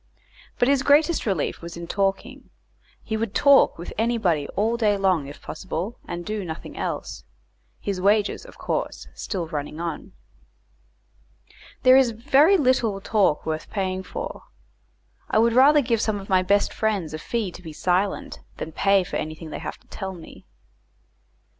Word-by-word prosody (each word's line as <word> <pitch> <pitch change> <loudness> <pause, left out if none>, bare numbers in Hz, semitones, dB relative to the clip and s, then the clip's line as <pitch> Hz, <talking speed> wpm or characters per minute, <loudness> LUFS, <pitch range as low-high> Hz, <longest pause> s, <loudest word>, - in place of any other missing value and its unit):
But 245 - +3
his 275 -1 +3
greatest 295 +1 +3
relief 190 -8 -1
was 170 0 -8
in 170 - -6
talking; 200 +9 -2 0.5
he 220 - -3
would 220 -1 -3
talk 280 -1 +5
with 170 - -7
anybody 210 -11 +1
all 220 +4 +1
day 215 -3 +2
long 185 -7 +1
if 145 - -11
possible, 190 +5 -5
and 175 0 -5
do 215 -1 -3
nothing 160 -3 -7
else; - - -4 0.6
his 195 -3 -3
wages, 205 +2 +2
of - - -14
course, - - -3
still 180 -5 -4
running 150 -1 -5
on. 170 -2 -5 1.7
There 255 0 +8
is 265 -2 +5
very 280 - +4
little 250 - +2
talk 195 -6 +1
worth 155 0 -3
paying 190 -2 -2
for. - - -7 0.8
I - - +1
would 230 +1 +4
rather 285 +4 +6
give 230 -4 0
some 215 -3 0
of 195 - -10
my 185 -1 +4
best 200 +2 +2
friends 200 -8 -1
a 155 - -4
fee 220 +1 -2
to 175 - -12
be 165 -3 -8
silent, 180 +5 -1 0.2
than 160 - -5
pay 195 +3 +3
for - - -4
anything 155 +1 -6
they - - -5
have - - -6
to - - -30
tell 190 0 -5
me. 165 -2 -13
200 Hz, 165 wpm, -24 LUFS, 175-235 Hz, 1.7 s, There